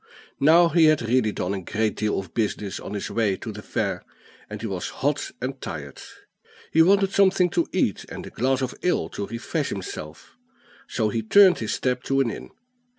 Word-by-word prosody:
Now 165 +4 +6
he 165 -1 +5
had 155 -5 +4
really 115 -1 +2
done 95 -1 -3
a 95 - -3
great 110 +4 -1
deal 105 -1 -1
of 95 -1 -6
business 105 -3 -2
on 105 - -7
his 100 - -4
way 110 -4 +1
to 110 - -6
the 105 0 -8
fair, - - -2 0.5
and 105 0 -6
he 115 - -6
was 95 -4 -3
hot 145 +1 -1
and 130 +1 -5
tired. 70 -4 -7 0.7
He 160 - +6
wanted 195 +3 +4
something 190 -2 +4
to 170 - +1
eat, 145 - 0
and - - -7
a - - -10
glass 130 +2 0
of 130 - -2
ale 180 - 0
to 100 - -5
refresh 120 - -3
himself; 80 -5 -7 0.5
so 110 -2 0
he 115 +2 -1
turned 190 - +6
his 110 - -2
steps 125 -1 -2
to 135 0 +2
an 125 -4 +2
inn. - - -8
115 Hz, 200 wpm, -24 LUFS, 105-155 Hz, 0.7 s, Now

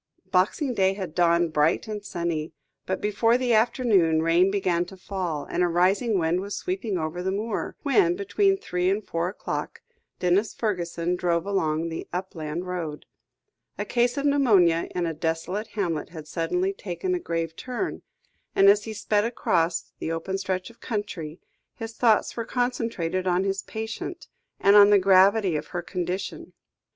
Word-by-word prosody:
Boxing 210 - +2
Day 190 -3 +2
had 190 -5 -6
dawned 170 -2 +2
bright 155 +8 +2
and 210 -1 -5
sunny, 170 -4 -3 0.3
but 190 - -2
before 225 +3 +2
the 250 -2 +1
afternoon, 210 -8 +3
rain 170 +3 +4
began 185 -3 +1
to 190 +2 -12
fall, 180 -6 -4
and - - -1
a 180 - +4
rising 190 +6 +2
wind 170 +1 +1
was 200 +1 -5
sweeping 360 - -2
over 160 +2 -3
the 190 +1 -1
moor, 210 +2 -3
when, 345 +5 +3
between 395 0 +2
three 180 - -1
and 200 +2 -1
four 170 +1 -1
o'clock, 195 - -5 0.4
Denis 185 +4 +1
Fergusson 175 -4 -1
drove 175 -1 0
along 165 -5 0
the 165 - -6
upland 175 -2 -4
road. 165 -5 -5 0.7
A 205 - -2
case 240 +4 +1
of 280 - -1
pneumonia 205 - +4
in 175 -1 0
a 165 - -2
desolate 165 +6 -2
hamlet 165 -8 -1
had 160 -3 -9
suddenly 180 +4 -1
taken 200 - -3
a 360 - 0
grave 165 - -3
turn, 255 - -4 0.5
and 195 0 +7
as 205 +1 +4
he 220 - -5
sped 205 0 +1
across 170 -7 0
the 160 - -3
open 190 +4 -3
stretch 185 +2 -3
of 230 - -25
country, 190 -8 -4 0.4
his 225 0 -6
thoughts 225 -2 +2
were 230 - -2
concentrated 230 -8 -1
on 180 +1 +2
his 195 0 -1
patient, 220 0 -6 0.3
and 200 +1 +5
on 205 0 +9
the 205 - +7
gravity 195 0 +4
of 150 - -3
her 175 -1 -4
condition. 180 +1 -4
190 Hz, 165 wpm, -25 LUFS, 170-215 Hz, 0.7 s, on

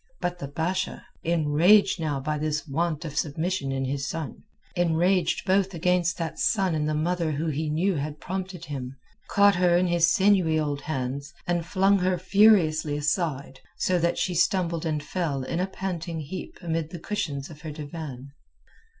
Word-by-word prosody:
But 175 -1 -2
the 140 - -5
Basha, 175 +6 -2 0.2
enraged 170 +5 +4
now 150 -4 -1
by 150 +2 -2
this 155 +1 -2
want 160 +2 -1
of 150 -3 -6
submission 155 0 -1
in 135 0 -1
his 140 +1 -2
son, 160 -4 -5 0.3
enraged 175 +1 +2
both 190 -1 +2
against 180 +1 +1
that 165 -2 -4
son 195 -6 +2
and 155 -1 0
the 155 - 0
mother 165 0 0
who 155 +3 -1
he 155 +1 -2
knew 170 +4 +1
had 150 +1 -4
prompted 185 -2 -5
him, 135 -3 -6 0.3
caught 200 -2 +5
her 175 -1 +4
in 180 - +2
his 170 -1 +3
sinewy 185 -5 +3
old 145 -2 -2
hands, 140 +1 -4
and 175 -1 -1
flung 195 +1 +3
her 185 0 +1
furiously 175 -6 +4
aside, 145 -3 -1 0.2
so 180 -1 +1
that 170 +1 +1
she 185 - 0
stumbled 170 -2 +1
and 150 -2 -1
fell 145 -5 -2
in 165 +6 -3
a 185 - 0
panting 175 -4 -4
heap 170 +5 -7
amid 165 -2 -2
the 175 - -7
cushions 155 -7 -3
of 150 -1 -12
her 155 - -6
divan. 145 -3 -7
165 Hz, 175 wpm, -26 LUFS, 150-180 Hz, 0.3 s, caught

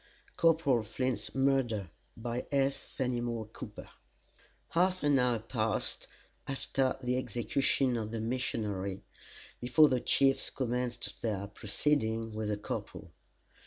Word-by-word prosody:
CORPORAL 160 -7 +4
FLINT'S 130 +4 -2
MURDER 130 -9 +1 0.3
By 120 +1 -3
J. 140 -1 +3
FENIMORE 120 -4 -3
COOPER - - -8 0.8
Half 185 +1 +2
an 145 -2 +4
hour 125 -2 +3
passed 110 -1 -1 0.4
after 135 -1 0
the 125 +1 +1
execution 125 +2 +1
of 110 -2 -3
the 115 0 -3
missionary 105 -5 -2 0.6
before 145 +5 +5
the 130 - +2
chiefs 135 +2 +3
commenced 125 -1 -2
their 105 -4 -1
proceedings 115 0 0
with 110 0 -2
the 105 - 0
corporal. 105 - -6
125 Hz, 115 wpm, -32 LUFS, 110-135 Hz, 0.8 s, before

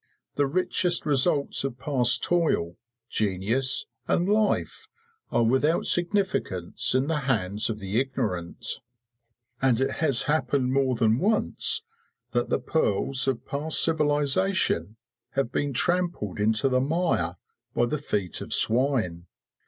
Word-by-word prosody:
The 145 -1 +1
richest 180 +2 +1
results 145 0 +1
of 135 -3 -3
past 125 -3 +1
toil, 160 - +1 0.3
genius, 110 +7 0 0.2
and 175 - +1
life 210 +1 0 0.4
are 120 - +2
without 130 +8 +2
significance 175 - 0
in 130 +1 +2
the 155 0 0
hands 105 -3 0
of 110 - -2
the 100 +2 -1
ignorant; 115 -11 -3 0.8
and 130 -3 +3
it 135 - +1
has 135 -5 +2
happened 140 -4 0
more 135 -2 +2
than 115 0 +2
once 435 - +1 0.5
that - - 0
the - - +2
pearls 135 -1 0
of 130 -3 -1
past 150 +3 -1
civilisation 150 - +1 0.4
have 135 -4 -1
been 145 -1 -1
trampled 175 - 0
into 110 +4 +2
the 130 -1 +2
mire 140 - 0 0.4
by 120 - +3
the 145 +5 -2
feet 100 - -3
of - - -4
swine. 115 -9 +1
135 Hz, 130 wpm, -26 LUFS, 110-160 Hz, 0.8 s, and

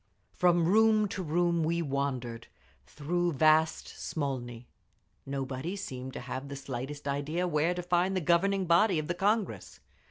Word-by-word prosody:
From 175 -2 +3
room 215 +3 +4
to 190 - -4
room 170 0 +1
we 170 +2 0
wandered, 130 -5 -3 0.4
through 175 +3 -1
vast 155 +2 +3
Smolny. 125 -5 -5 0.6
Nobody 135 +5 -3
seemed 130 -9 -6
to - - -6
have 130 +2 -6
the 140 - -6
slightest 135 +2 -6
idea 150 +6 -1
where 165 +2 +1
to 180 - -4
find 180 +2 +1
the - - +2
governing 190 +4 +2
body 175 +2 +4
of 155 -1 -2
the 175 - 0
Congress. 205 +3 -1
160 Hz, 150 wpm, -30 LUFS, 140-180 Hz, 0.6 s, room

